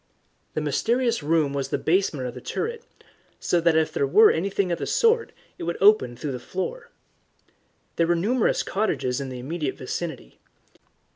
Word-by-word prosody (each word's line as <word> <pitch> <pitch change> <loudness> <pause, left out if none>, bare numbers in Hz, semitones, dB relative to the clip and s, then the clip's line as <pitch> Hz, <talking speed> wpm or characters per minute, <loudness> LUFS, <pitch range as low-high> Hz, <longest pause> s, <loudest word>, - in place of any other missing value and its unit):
The 155 - 0
mysterious 230 - 0
room 150 -1 +1
was 140 -1 -2
the - - -1
basement 165 -6 0
of 120 - -6
the 125 - -9
turret, 465 - -4 0.6
so 175 - +1
that 165 -1 +3
if 160 -1 +1
there 140 - +1
were 215 +11 +6
anything 190 +2 -1
of 170 - -1
the - - -3
sort 460 0 +2 0.3
it - - -5
would 170 0 -2
open 195 - +4
through 145 +3 -4
the 125 - -5
floor. 190 - -5 1.1
There 165 - +2
were 175 - +3
numerous 220 +8 +1
cottages 145 -11 -1
in 135 - -5
the 130 - -6
immediate 145 +3 -4
vicinity. 135 - -6
165 Hz, 170 wpm, -24 LUFS, 140-210 Hz, 1.1 s, were